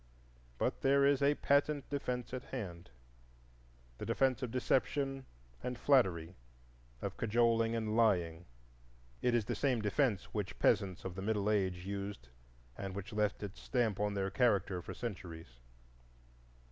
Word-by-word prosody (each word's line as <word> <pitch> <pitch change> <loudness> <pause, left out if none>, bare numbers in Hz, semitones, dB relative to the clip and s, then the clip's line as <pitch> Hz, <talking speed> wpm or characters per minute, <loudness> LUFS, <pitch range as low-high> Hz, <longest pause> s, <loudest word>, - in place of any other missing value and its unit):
But - - -1
there 140 +1 +4
is 140 -1 +4
a 140 +1 +4
patent 140 0 +2
defence 125 -3 -3
at 130 0 -4
hand,—the - - -11
defence 130 0 +2
of 125 - -2
deception 135 +2 0 0.3
and 125 -1 -3
flattery, 95 - +3 0.7
of - - -4
cajoling 115 0 +2
and 110 -1 -1
lying. 90 -7 +2 0.8
It 125 -1 +2
is 115 -3 +1
the 120 - -2
same 125 +2 +1
defence 105 -1 0
which 105 -3 -3
peasants 95 -4 +2
of 95 - -3
the 95 - -6
Middle 105 0 +1
Age 95 -4 0
used 100 -10 -5 0.5
and 95 +3 -5
which 100 +3 -6
left 105 0 0
its 100 -1 -7
stamp 120 -6 0
on 105 0 0
their 95 -1 -1
character 100 -6 +2
for - - -8
centuries. 85 - -7
105 Hz, 140 wpm, -34 LUFS, 90-125 Hz, 0.8 s, there